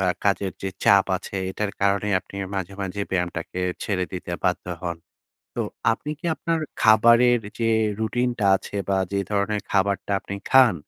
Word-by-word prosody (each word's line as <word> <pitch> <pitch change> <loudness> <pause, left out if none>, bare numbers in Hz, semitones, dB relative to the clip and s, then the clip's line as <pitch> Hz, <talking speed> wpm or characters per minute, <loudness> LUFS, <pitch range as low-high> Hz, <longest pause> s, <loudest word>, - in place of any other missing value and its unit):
বা, 95 - +2 0.2
কাজের 100 -1 +1
যে 95 - -1 0.2
চাপ 100 -1 +6
আছে, 100 - -9 0.2
এটার 105 +1 -2
কারণে 100 +1 +2
আপনি 100 - -12 0.2
মাঝে, 95 0 -3
মাঝে 95 +2 -3
ব্যায়ামটাকে 90 0 -2 0.2
ছেড়ে 95 -3 -1
দিতে 90 -1 -6
বাধ্য 90 0 +1 0.2
হন। 85 -1 -3 0.6
তো - - -2 0.3
আপনি 150 +6 -5
কি - - -24
আপনার 165 0 -1 0.2
খাবারের 115 +2 +6 0.2
যে 115 -1 +1 0.3
রুটিনটা 120 -1 0
আছে 100 +2 -8
বা, 95 -1 +2
যে 100 - +1
ধরনের 105 +1 0
খাবারটা 100 0 +1
আপনি 100 - -6 0.2
খান, 130 -7 +7
100 Hz, 160 wpm, -24 LUFS, 95-110 Hz, 0.6 s, খান